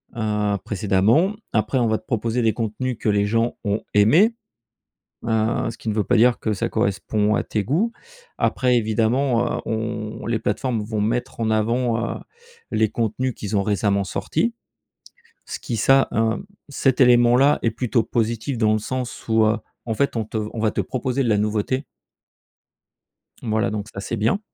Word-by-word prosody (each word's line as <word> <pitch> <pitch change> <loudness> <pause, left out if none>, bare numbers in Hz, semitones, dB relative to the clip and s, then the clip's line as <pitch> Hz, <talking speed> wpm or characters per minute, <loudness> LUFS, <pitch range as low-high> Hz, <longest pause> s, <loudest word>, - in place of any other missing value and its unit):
heu, 105 -2 0
précédemment. 105 - +2 0.2
Après 110 +4 +1
on 120 - +2
va 110 - +1
te 110 - -18
proposer 115 0 -1
des 110 -2 +2
contenus 115 +2 -3
que 110 - 0
les 100 0 +2
gens 115 +3 0
ont 105 0 -1
aimés. 160 - +5 0.9
Heu, 110 0 0
ce - - -9
qui - - -6
ne 105 - 0
veut 105 -1 +1
pas - - +2
dire 120 +2 +4
que 110 - -1
ça 95 - -2
correspond 105 +2 0
à - - +1
tes 105 -2 -2
goûts. 185 - 0 0.5
Après 125 -1 +2
évidemment, 120 +2 +1
heu, - - -3
on 110 -1 -4
les 115 -1 0
plateformes 110 +2 -1
vont 105 0 -3
mettre 115 +2 -2
en 110 - +1
avant, 115 +1 0
heu, - - -9 0.5
les 110 - +2
contenus 120 +3 -1
qu'ils 105 0 -3
ont 100 - +2
récemment 100 -1 +1
sortis, 175 - -1 0.9
ce - - -5
qui 120 - -4
ça, 135 +5 +4
un 110 0 0 0.3
cet 135 -2 +1
élément-là 125 +3 +5
est 115 - +2
plutôt 115 +1 0
positif 115 +3 -2
dans 110 -1 +3
le 110 - +2
sens 125 +3 -5
où, 110 0 +4
heu, 110 +1 +2 0.3
en 115 - -1
fait, 140 +2 0
on 115 - 0
te 110 +1 -4
on - - -7
va 110 -1 +2
te - - -2
proposer 130 +1 -2
de 125 - 0
la 105 -2 +3
nouveauté. 105 +6 -1 1.6
Voilà, 110 -1 0
donc 105 -1 -4
ça, - - -6
c'est 115 +3 -4
bien. 110 - +1
115 Hz, 180 wpm, -22 LUFS, 105-125 Hz, 1.6 s, aimés